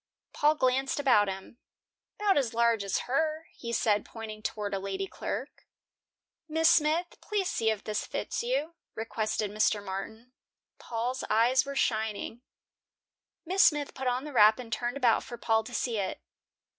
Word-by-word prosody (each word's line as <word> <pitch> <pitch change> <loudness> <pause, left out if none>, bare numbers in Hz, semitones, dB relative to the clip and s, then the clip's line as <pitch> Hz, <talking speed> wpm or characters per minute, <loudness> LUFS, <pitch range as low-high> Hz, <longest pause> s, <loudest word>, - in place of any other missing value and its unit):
Paul 300 +1 +3
glanced 265 0 +1
about 245 -7 +4
him. 195 +5 -7 0.6
"'Bout 410 -1 +3
as 250 -5 0
large 235 -2 +3
as 200 - -1
her." 310 +4 0
he 235 - -6
said, 210 -3 +2
pointing 220 -1 -8
toward 210 -2 -3
a 195 - 0
lady 195 0 -3
clerk. 250 +7 -6 0.8
"Miss 320 +1 +4
Smith, 325 +3 +2
please 410 -3 -1
see 225 - +1
if 215 -2 -2
this 215 -1 -3
fits - - -3
you," 470 -10 -1 0.2
requested 215 -2 -2
Mr. 210 -1 +1
Martin. 220 +6 -6 0.5
Paul's 245 +2 -3
eyes 245 +5 +3
were 280 - -4
shining. 220 -1 -1 1.0
Miss 375 +4 +4
Smith 295 -2 +3
put 265 -1 -4
on 250 +1 0
the 300 -1 -7
wrap 215 -2 +6
and 240 -2 -6
turned 240 +2 -2
about 245 -5 +3
for 240 - -8
Paul 225 -1 +1
to 245 - -9
see 230 -2 -1
it. 190 -1 -3
235 Hz, 160 wpm, -29 LUFS, 215-280 Hz, 1.0 s, wrap